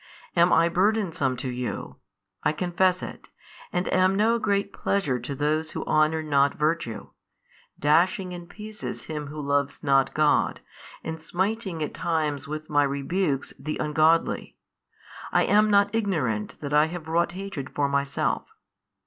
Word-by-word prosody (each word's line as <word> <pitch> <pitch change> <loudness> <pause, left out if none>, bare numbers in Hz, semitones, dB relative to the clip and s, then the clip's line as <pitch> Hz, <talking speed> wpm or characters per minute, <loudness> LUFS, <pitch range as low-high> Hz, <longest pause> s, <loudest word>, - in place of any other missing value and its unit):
I 170 - +4
am 170 -1 +4
burdensome 180 - +1
to 130 - -4
you, 125 -1 -5 0.5
I - - +2
confess 180 +2 +1
it, - - -8 0.4
and 180 +1 -1
am 185 +1 +4
no 225 +3 +3
great 200 -2 0
pleasure 145 -11 0
to 125 +4 -5
those 155 +3 0
who - - -4
honour 155 +1 +2
not 140 -2 +2
virtue; 150 -7 -2 0.7
dashing 180 +5 +2
in 175 -1 -8
pieces 215 +2 -7
him 150 -2 -5
who 150 +2 -7
loves 140 0 -1
not 135 -2 +4
|537 - - -24
God, 155 -1 +2 0.4
and 160 0 -5
smiting 190 0 -2
at 150 - -4
times 155 -4 -1
with 155 +1 -5
My 145 -1 +3
rebukes 140 +2 -1
the 155 +3 -4
ungodly, 155 +2 +1 0.7
I - - +4
am 210 +1 +4
not 200 0 +4
ignorant 155 - -1
that 145 -1 -4
I 150 +1 +5
have 165 -1 -7
wrought 170 +1 +1
hatred 190 -8 -6
for 145 -1 0
Myself. 140 0 -1
160 Hz, 150 wpm, -26 LUFS, 145-185 Hz, 0.7 s, I